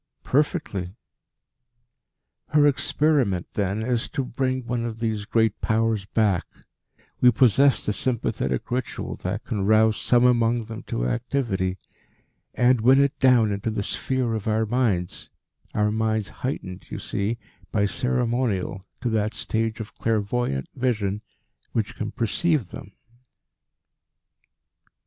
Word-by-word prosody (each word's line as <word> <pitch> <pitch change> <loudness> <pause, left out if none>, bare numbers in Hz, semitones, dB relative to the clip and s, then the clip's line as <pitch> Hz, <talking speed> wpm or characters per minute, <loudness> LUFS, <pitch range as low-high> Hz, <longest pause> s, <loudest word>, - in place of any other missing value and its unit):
"Perfectly." 130 - -1 1.5
"Her 150 -1 +4
experiment, 140 - +2
then, 100 +1 -1
is 120 -2 -1
to 135 - -2
bring 130 0 -2
one 120 0 -2
of 115 -1 -4
these 110 -3 -2
great 110 -2 +1
Powers 110 -2 +1
back 105 -4 +1 0.8
we 125 - +8
possess 135 +2 +4
the 105 - 0
sympathetic 105 - -1
ritual 125 0 -3
that 105 +6 -4
can 105 -5 -2
rouse 110 0 +4
some 120 0 +4
among 120 -1 +3
them 110 0 -7
to - - -2
activity 100 - -1 0.8
and 125 -1 +4
win 130 +4 +6
it 140 -1 +2
down 125 -5 +5
into 100 +2 -2
the 110 -2 -2
sphere 130 +1 -1
of 110 -2 -3
our 110 +1 +2
minds, 105 -7 -1 0.5
our 105 0 +2
minds 110 -1 0
heightened, 95 -8 -4
you - - -5
see, 105 +4 -2 0.3
by 100 -2 +2
ceremonial 115 -4 -1
to 125 - 0
that 110 0 0
stage 110 0 -1
of 110 0 -7
clairvoyant 110 - 0
vision 105 -6 -1 0.5
which 110 -3 -1
can 110 - -4
perceive 130 - 0
them." - - -10
115 Hz, 125 wpm, -24 LUFS, 105-125 Hz, 1.5 s, we